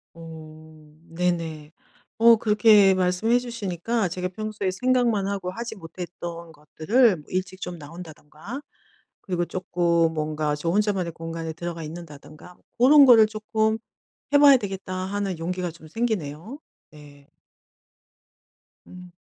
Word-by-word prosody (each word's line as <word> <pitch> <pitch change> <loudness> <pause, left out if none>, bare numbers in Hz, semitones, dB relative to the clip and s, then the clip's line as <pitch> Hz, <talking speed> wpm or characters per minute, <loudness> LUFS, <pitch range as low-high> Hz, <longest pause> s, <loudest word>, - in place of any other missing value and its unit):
어 155 -1 -13 0.2
네네. 165 -3 -3 0.5
어 230 0 +8
그렇게 210 -2 +5
말씀해 185 +6 +1
주시니까 225 -3 -2
제가 180 +1 -3
평소에 210 -1 -4
생각만 235 -1 +1
하고 195 -2 -3
하지 230 +2 -6
못했던 170 -1 -8
것들을 160 - +1
일찍 185 +1 -3
좀 175 -1 -5
나온다든가 160 - -10 0.6
그리고 180 -2 -2
쪼끔 170 -3 0
뭔가 155 -1 -2
저 165 +3 -3
혼자만의 195 -3 0
공간에 165 0 -6
들어가 170 0 -6
있는다든가 155 +1 -11 0.2
고런 280 +4 +7
거를 225 -4 +7
쪼끔 220 0 -1 0.6
해 - - +7
봐야 285 -2 +8
되겠다 195 -3 -6
하는 190 -1 -3
용기가 180 +1 -3
좀 160 -1 -15
생기네요. 215 - -3 0.3
네. 145 -2 -16 1.6
음. 180 -1 -13
180 Hz, 270 characters per minute, -24 LUFS, 165-215 Hz, 1.6 s, 어